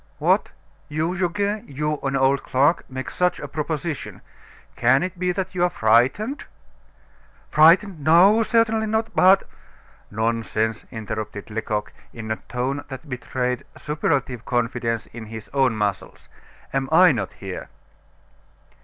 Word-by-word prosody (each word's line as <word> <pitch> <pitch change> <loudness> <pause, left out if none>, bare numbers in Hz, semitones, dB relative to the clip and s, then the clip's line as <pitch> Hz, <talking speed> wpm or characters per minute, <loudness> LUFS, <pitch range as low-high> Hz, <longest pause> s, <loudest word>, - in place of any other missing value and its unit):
"What! - - +2 0.4
you 155 +3 -1
Goguet, 200 +3 -1
you, 150 +2 -2
an 135 0 -1
old 135 0 +3
clerk 140 +6 +1
make 130 0 -5
such 180 -1 0
a 145 - -6
proposition! 150 +1 -4 0.5
Can 130 +5 +3
it 185 -1 -5
be 180 0 +1
that 190 0 -3
you're 180 -1 +2
frightened?" 130 - +2 1.1
"Frightened! 165 +2 +5
No, 185 +9 +6
certainly 225 -1 +2
not; 220 +1 -1
but 190 +2 +6 0.4
" - - -29 0.3
"Nonsense!" 110 0 -1
interrupted 110 -2 -6
Lecoq, 105 -1 -3 0.2
in 110 -1 -6
a 110 - -1
tone 130 +4 -2
that 135 +2 -9
betrayed 125 -1 -2
superlative 140 -5 -1
confidence 115 -1 -1
in 110 -2 -8
his 110 -2 -9
own 135 -4 +2
muscles; 105 -2 -3 0.4
"Am 135 -1 -1
I 180 +2 +7
not 105 -8 -3
here?" 95 -2 -7
135 Hz, 130 wpm, -23 LUFS, 115-180 Hz, 1.1 s, I